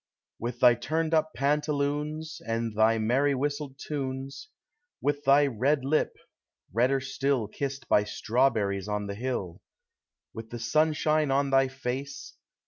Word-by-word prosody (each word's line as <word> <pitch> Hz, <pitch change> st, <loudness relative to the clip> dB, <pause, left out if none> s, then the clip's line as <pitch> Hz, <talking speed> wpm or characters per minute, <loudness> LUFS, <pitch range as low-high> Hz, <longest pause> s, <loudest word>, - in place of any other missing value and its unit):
With 120 Hz, +1 st, -5 dB
thy 125 Hz, -1 st, +8 dB
turned 155 Hz, +7 st, -2 dB
up 155 Hz, 0 st, +2 dB
pantaloons, 150 Hz, +2 st, -1 dB
And 115 Hz, -1 st, -2 dB
thy 110 Hz, +1 st, +4 dB
merry 130 Hz, +6 st, +2 dB
whistled 145 Hz, 0 st, -3 dB
tunes; 135 Hz, -, -5 dB, 0.5 s
With 145 Hz, 0 st, -1 dB
thy 140 Hz, +2 st, +6 dB
red 135 Hz, +2 st, +1 dB
lip, 155 Hz, +3 st, +1 dB, 0.6 s
redder 125 Hz, +5 st, +3 dB
still 135 Hz, -3 st, -1 dB
Kissed 140 Hz, +5 st, -5 dB
by 105 Hz, -, +3 dB
strawberries 105 Hz, -4 st, 0 dB
on 105 Hz, 0 st, -2 dB
the 100 Hz, -, -4 dB
hill; 105 Hz, -6 st, -4 dB, 0.7 s
With 110 Hz, 0 st, -8 dB
the 120 Hz, -, -6 dB
sunshine 155 Hz, +4 st, +2 dB
on 135 Hz, +1 st, +1 dB
thy 135 Hz, 0 st, +4 dB
face. 135 Hz, +1 st, -5 dB
135 Hz, 135 wpm, -28 LUFS, 115-145 Hz, 0.7 s, thy